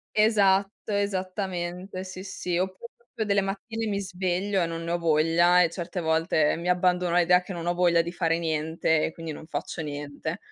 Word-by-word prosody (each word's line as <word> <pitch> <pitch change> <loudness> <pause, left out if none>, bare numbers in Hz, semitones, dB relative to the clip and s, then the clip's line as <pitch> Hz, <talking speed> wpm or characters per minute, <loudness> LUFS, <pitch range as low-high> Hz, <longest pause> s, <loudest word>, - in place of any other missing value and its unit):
Esatto, 205 -1 +3
esattamente, 185 -2 -3
sì, 185 0 -8
sì. 180 -2 -4
Oppure 190 +5 -4
proprio 235 -2 -6
delle 200 -1 +2
mattine 220 +3 -4
mi 200 -1 -1
sveglio 185 +1 -1
e 170 - +1
non 165 0 -5
ne 170 - -3
ho 175 - 0
voglia, 170 +2 +4
e 165 - 0
certe 175 +1 -4
volte 160 -1 +2
mi 170 +2 -3
abbandono 180 -1 +2
all'idea 180 +1 +5
che 180 +2 -9
non 170 -1 -5
ho 175 - +1
voglia 175 -1 +3
di 170 - -5
fare 165 -2 0
niente, 160 -1 0
e - - -3
quindi 165 -1 -7
non 155 +1 -9
faccio 160 - -4
niente. 145 -1 -5
180 Hz, 190 wpm, -26 LUFS, 165-190 Hz, -, all'idea